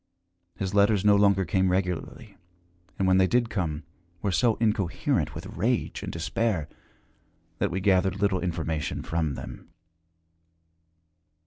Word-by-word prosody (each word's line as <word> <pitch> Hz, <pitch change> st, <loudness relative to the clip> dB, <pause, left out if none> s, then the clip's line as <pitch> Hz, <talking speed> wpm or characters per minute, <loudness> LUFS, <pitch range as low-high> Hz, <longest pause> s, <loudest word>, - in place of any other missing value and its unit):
His 95 Hz, +1 st, -3 dB
letters 100 Hz, 0 st, +3 dB
no 105 Hz, -1 st, +6 dB
longer 100 Hz, -2 st, +3 dB
came 95 Hz, 0 st, +1 dB
regularly, 90 Hz, -2 st, -3 dB, 0.6 s
and, 95 Hz, -, +1 dB
when 95 Hz, 0 st, +4 dB
they 95 Hz, -, +4 dB
did 120 Hz, +2 st, +1 dB
come, 80 Hz, -7 st, -2 dB, 0.4 s
were 100 Hz, -, +1 dB
so 115 Hz, +3 st, +2 dB
incoherent 105 Hz, -5 st, 0 dB
with -, -, -7 dB
rage -, -, -1 dB
and -, -, -5 dB
despair 105 Hz, -10 st, -1 dB, 0.9 s
that -, -, +1 dB
we 95 Hz, +3 st, -3 dB
gathered 95 Hz, 0 st, +2 dB
little 100 Hz, -2 st, +1 dB
information 80 Hz, -4 st, -3 dB
from 80 Hz, -4 st, -1 dB
them. -, -, -9 dB
95 Hz, 130 wpm, -26 LUFS, 90-100 Hz, 0.9 s, no